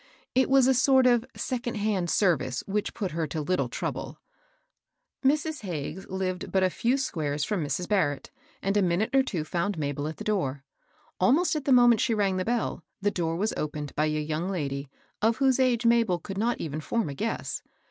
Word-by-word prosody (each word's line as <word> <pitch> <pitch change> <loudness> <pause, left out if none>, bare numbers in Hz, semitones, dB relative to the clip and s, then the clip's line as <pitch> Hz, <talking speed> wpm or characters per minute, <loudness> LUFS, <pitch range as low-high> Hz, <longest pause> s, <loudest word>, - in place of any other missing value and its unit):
It 260 +1 +3
was 270 -1 +5
a 265 - +5
sort 260 +1 +4
of 240 -1 +3
second 245 -2 -3
hand 205 -4 0
service 160 - +1
which 205 +1 -2
put 195 -5 -3
her 160 0 -2
to 160 - -4
little 180 +5 0
trouble. - - -4 1.1
Mrs. 300 +2 +1
Hagges 175 -1 -5
lived 185 -1 -3
but 190 -1 +2
a 185 - +2
few 240 - +1
squares 155 - -2
from 195 -1 -1
Mrs. 175 +5 -2
Barrett, 155 -9 0 0.3
and 195 +1 0
a 205 - +4
minute 185 +7 +1
or 270 - +7
two 190 -12 -2
found 175 +4 -2
Mabel 145 -1 -2
at 160 - -6
the - - -6
door. 145 -10 -1 0.6
Almost 295 - +3
at 300 -3 -3
the 275 - +1
moment 240 -3 +6
she 230 - +2
rang 195 -3 +1
the 185 - 0
bell, 235 0 -1 0.2
the 205 0 +1
door 165 -3 -1
was 210 +6 0
opened 150 -1 -4
by 155 - +2
a 155 0 0
young 155 +4 -2
lady, 140 -6 -3 0.3
of 225 +1 +3
whose 265 -1 +3
age 245 -2 +2
Mabel 230 -6 +4
could 195 +3 -6
not 235 +3 0
even 155 -1 -4
form 230 +6 -1
a 140 - -4
guess. 225 +11 -3
195 Hz, 200 wpm, -27 LUFS, 160-235 Hz, 1.1 s, or